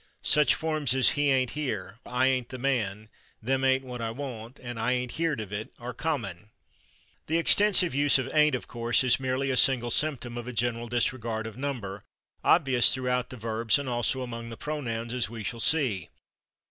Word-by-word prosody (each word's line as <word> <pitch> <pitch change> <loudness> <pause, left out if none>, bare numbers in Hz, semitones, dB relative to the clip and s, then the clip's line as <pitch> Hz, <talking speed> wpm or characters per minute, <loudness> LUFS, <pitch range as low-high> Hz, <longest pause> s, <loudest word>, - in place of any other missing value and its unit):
Such 150 -4 +4
forms 155 -5 0
as 130 - +5
"he 145 -1 +1
/ain't/ 130 -2 +2
here," 115 -7 -4
"I 125 +1 +1
/ain't/ 130 -2 +1
the 130 - -8
man," 110 -6 -1 0.3
"them 130 +4 -1
/ain't/ 135 0 +2
what 125 -2 -7
I 115 - -2
want" 120 -1 -7
and 120 -2 -7
"I 125 +3 +1
/ain't/ 125 -1 -3
heerd 165 -5 -1
of 105 -2 -6
it" 105 +2 -5
are 125 +1 -7
common. 110 - -4 0.8
This 160 - +1
extensive 190 -2 +4
use 145 +1 +4
of 130 - -2
/ain't/, 150 -2 +4
of 125 - -6
course, 120 +2 0
is 130 0 +4
merely 130 +1 -1
a - - 0
single 120 -3 +3
symptom 125 -5 0
of 120 - -8
a 125 - -5
general 120 +1 -1
disregard 115 -1 -1
of 110 - -7
number, 120 -8 -5 0.4
obvious 135 -7 +5
throughout 125 -1 -1
the 125 - -9
verbs, 110 -1 +1
and 140 -1 -5
also 125 +1 0
among 115 -1 -7
the 115 - -8
pronouns, 120 -6 -4
as 125 -3 -1
we 115 -2 -7
shall 115 +4 -4
see. 115 - +1
125 Hz, 195 wpm, -27 LUFS, 115-135 Hz, 0.8 s, as